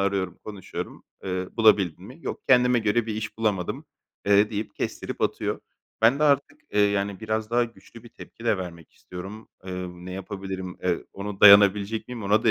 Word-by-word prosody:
arıyorum, 100 -1 -1
konuşuyorum. 105 -3 -7 0.2
Eee, 90 -1 -3
"Bulabildin 100 -6 +3
mi?" 130 +9 -12
"Yok, - - -5
kendime 125 -1 +5
göre 110 +1 +1
bir 110 - -3
iş 110 0 -5
bulamadım." 100 -5 -1 0.4
eee, 100 +1 +5
deyip 105 0 -4
kestirip - - -4
atıyor. - - -1 0.4
Ben 120 +5 +5
de - - 0
artık, 140 -1 +2
eee, 105 - +3
yani, 100 -1 +1
biraz 110 0 -2
daha 120 0 +3
güçlü 115 0 -14
bir 120 - -13
tepki 115 - -13
de 110 -3 +3
vermek 85 -3 -8
istiyorum. 95 +5 -10 0.2
Eee, 90 -1 -4
ne 90 +1 -9
yapabilirim, 95 -1 -6
eee, 90 -2 0
ona 100 0 -6
dayanabilecek 100 +2 +6
miyim, 120 -3 -6
ona 105 +3 +2
da 115 - +5
105 Hz, 180 wpm, -25 LUFS, 95-110 Hz, 0.4 s, dayanabilecek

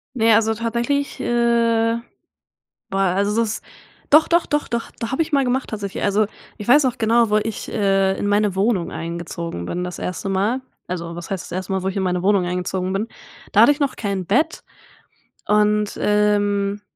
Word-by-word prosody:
Ne, 225 -2 +4
also, 225 0 +3
tatsächlich, 235 +5 -2
äh 230 -1 +2 0.9
boah, 195 - -1
also, 200 +3 +1
das 220 -1 -2 0.5
doch, 305 +2 +7
doch, 340 0 +2
doch, 295 0 0
doch, 235 -1 -3
da 230 +2 -4
habe 265 - -1
ich 320 - -6
mal 275 -1 +3
gemacht 255 +1 -1
tatsächlich. 205 -3 -4
Also, 205 +1 +2 0.3
ich 205 - -8
weiß 285 +5 +6
noch 255 -2 0
genau, 230 0 +3
wo 210 - +3
ich, 215 +1 -2
äh, 195 -1 +1
in - - -2
meine 205 -1 +2
Wohnung 195 -4 +1
eingezogen 170 - -5
bin 180 - -3
das 180 -1 -6
1. 180 +2 -4
Mal 200 +7 0 0.3
also, 170 -2 -4
was 170 +2 -8
heißt 190 -3 -3
das - - -11
1. 185 +1 -4
Mal, 190 -1 -1
wo 190 - -1
ich 190 - -4
in - - 0
meine 180 -1 0
Wohnung 195 -2 +3
eingezogen 180 +1 -2
bin, 210 +4 -1 0.4
da - - +5
hatte 290 - +8
ich 290 - -6
noch 280 -3 0
kein 200 -4 -2
Bett 240 - 0 0.8
und, 210 0 +2
ähm 205 -1 +1
210 Hz, 190 wpm, -21 LUFS, 190-230 Hz, 0.9 s, hatte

